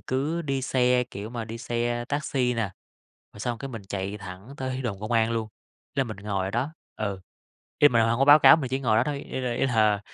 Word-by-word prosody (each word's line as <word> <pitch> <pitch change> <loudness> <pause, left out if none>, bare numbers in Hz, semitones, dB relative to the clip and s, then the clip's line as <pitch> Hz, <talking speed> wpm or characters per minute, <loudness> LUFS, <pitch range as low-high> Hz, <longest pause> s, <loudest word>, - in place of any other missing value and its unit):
cứ 145 +6 -1
đi 135 -3 -2
xe, 125 -1 +2
kiểu 105 -3 -8
mà, 120 -2 -4
đi 115 +1 -7
xe 120 -1 -2
taxi 135 -4 0
nà, 110 -5 -2 0.6
rồi - - -13
xong 120 +2 -2
cái 135 +3 -6
mình 115 -4 -7
chạy 100 +1 -3
thẳng 100 +5 -10
tới 130 0 -3
đồn 105 -6 -3
công 105 +3 -5
an 115 -1 +3
luôn, 115 -1 -1 0.5
nên 135 -2 +1
mình 110 -4 -6
ngồi 100 -2 -2
ở 95 - -3
đó, 130 +8 -1 0.2
ừ. 100 -3 -3 0.6
Ý 145 - +9
là - - -8
mình 115 -1 +4
hông 115 +1 +1
có 135 - +4
báo 145 +2 +9
cáo, - - +8
mình 140 -5 -3
chỉ 130 +2 -1
ngồi 115 -5 +2
đó 115 - +4
thôi, 145 0 -2
ý - - -3
là 125 -2 -1
ý 120 - +1
là, 110 -5 +3
120 Hz, 250 wpm, -26 LUFS, 110-130 Hz, 0.6 s, Ý